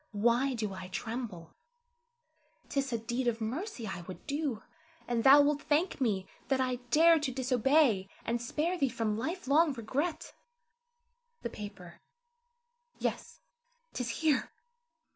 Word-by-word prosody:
Why 240 +5 +2
do 215 -4 -3
I 190 -1 -7
tremble? 210 -4 -5 1.2
'T 280 - 0
is 270 -1 -2
a 235 - +1
deed 240 +3 -2
of 230 -1 +1
mercy 255 - -4
I 185 -4 -5
would 185 - -9
do, 285 -6 -2 0.4
and 235 -2 0
thou 280 +2 +9
wilt 290 0 +2
thank 310 +1 0
me 200 -6 +1 0.2
that 270 -1 +1
I 255 -1 0
dared 325 +3 +6
to 280 -3 -1
disobey, 255 -4 +2 0.2
and 235 0 -1
spare 320 +9 -1
thee 275 - +2
from 225 -3 -1
life 330 - -3
long 300 +2 +4
regret. 265 +8 -3 1.1
The 235 - -3
paper, 200 -5 -9 1.0
yes, - - -4 0.5
'tis 250 -2 -3
here! 300 +2 +1
250 Hz, 140 wpm, -31 LUFS, 220-290 Hz, 1.2 s, thou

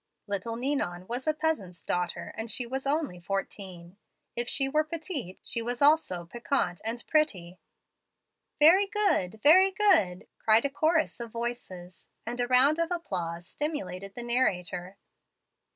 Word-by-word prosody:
Little 205 +3 -3
Ninon 235 -9 -2
was 245 +7 -5
a 310 - +3
peasant's 205 - -2
daughter, 180 -1 -3
and 225 +1 -4
she 230 +3 +1
was 265 +3 -4
only 285 - -1
fourteen. 190 -1 -5 0.4
If 240 0 -1
she 270 -1 +3
were 305 +3 +2
petite, 305 - -5
she 235 - -1
was 240 +1 -2
also 285 - +3
piquant 230 -3 -1
and 230 +2 -3
pretty 185 - 0 0.5
" - - -55
"Very 355 +7 +7
good, 300 - 0
very 370 +6 +7
good," 375 - +2
cried 220 +3 +4
a 280 - 0
chorus 315 +1 +1
of 235 -1 -7
voices; 230 -7 -6 0.2
and 240 +2 -3
a 245 - 0
round 265 +5 +5
of 335 0 0
applause 175 - -3
stimulated 200 - -4
the 240 - -5
narrator. 185 -6 -1
240 Hz, 150 wpm, -28 LUFS, 185-300 Hz, 0.5 s, Very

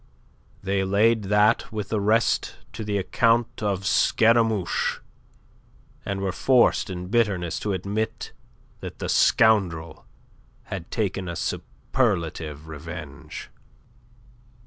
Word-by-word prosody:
They 95 0 0
laid 105 +3 +2
that 105 +3 +2
with 105 -3 -4
the 110 -2 0
rest 110 +3 +1 0.2
to 110 - -5
the 105 -1 -1
account 115 +4 +1
of 100 -3 -1
Scaramouche, 110 -1 +2 1.1
and 100 -1 -3
were 95 -1 -1
forced 125 +1 +3
in 90 -1 -6
bitterness 100 -7 0
to 105 - -2
admit 110 +5 -3 0.5
that - - -8
the - - -4
scoundrel 90 -8 +2 0.6
had 95 -4 -7
taken 95 -4 -2
a 85 - -4
superlative 85 - -2
revenge. 80 -1 -8
100 Hz, 105 wpm, -24 LUFS, 90-110 Hz, 1.1 s, forced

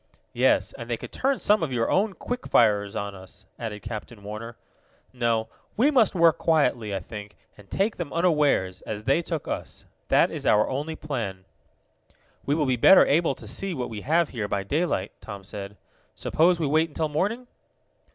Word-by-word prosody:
"Yes, - - +2
and - - -7
they - - -1
could - - -9
turn 270 0 0
some 210 +1 +3
of 160 -5 -1
your 115 -2 0
own 200 +1 +2
quick 245 +6 -5
firers 105 -3 +3
on 100 0 -3
us," 95 +1 -13
added 105 -3 -5
Captain 110 -1 -7
Warner. 110 +3 -7 0.6
"No, 115 -3 0 0.3
we 265 +7 +4
must 235 -9 +3
work 165 -2 +4
quietly, 125 -10 +1
I - - -1
think, 105 +2 -9 0.2
and 105 -1 -17
take 205 +3 0
them 170 -5 -5
unawares, 150 - +2
as 105 -1 -6
they 135 +8 +2
took 165 -3 -4
us. - - -6 0.2
That - - +4
is - - -5
our 105 0 +4
only 150 +4 -3
plan." 110 -12 -5 1.0
"We 145 - +2
will 155 -2 +1
be 130 -2 +1
better 190 +10 +7
able 160 +4 +2
to - - -12
see 195 -3 -3
what 125 -3 -4
we 105 -2 -6
have 165 +5 +2
here 110 -5 -3
by 100 -1 -1
daylight," 140 - -1
Tom 100 -1 -8
said. 100 +1 -8 0.4
"Suppose 170 +2 +2
we 160 - 0
wait 155 +3 +2
until 155 +1 -2
morning?" 205 +12 -1
130 Hz, 185 wpm, -25 LUFS, 105-165 Hz, 1.0 s, better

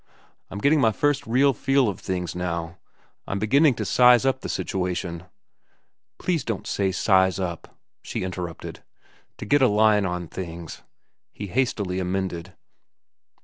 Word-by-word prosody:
I'm 100 - -7
getting 140 +7 +3
my 110 - +4
first 145 +4 0
real 135 +4 +3
feel 135 +2 +2
of 100 - -3
things 90 -3 -3
now. 85 -1 -4 0.5
I'm 100 - -2
beginning 135 +7 +3
to - - -3
size 125 0 +5
up 130 0 +1
the - - -5
situation—" 90 -2 -3 0.9
"Please 175 -4 -1
don't 115 -4 -4
say 95 -2 0
'size 95 0 +2
up,'" 85 -3 -5 0.2
she - - -4
interrupted. 90 -3 -6 0.6
"To - - -7
get 145 0 +3
a 130 - +6
line 105 -2 +3
on 90 -1 -4
things," 85 -2 -7 0.5
he 105 - -6
hastily 100 -5 -1
amended. 90 -2 -3
95 Hz, 145 wpm, -24 LUFS, 90-125 Hz, 0.9 s, a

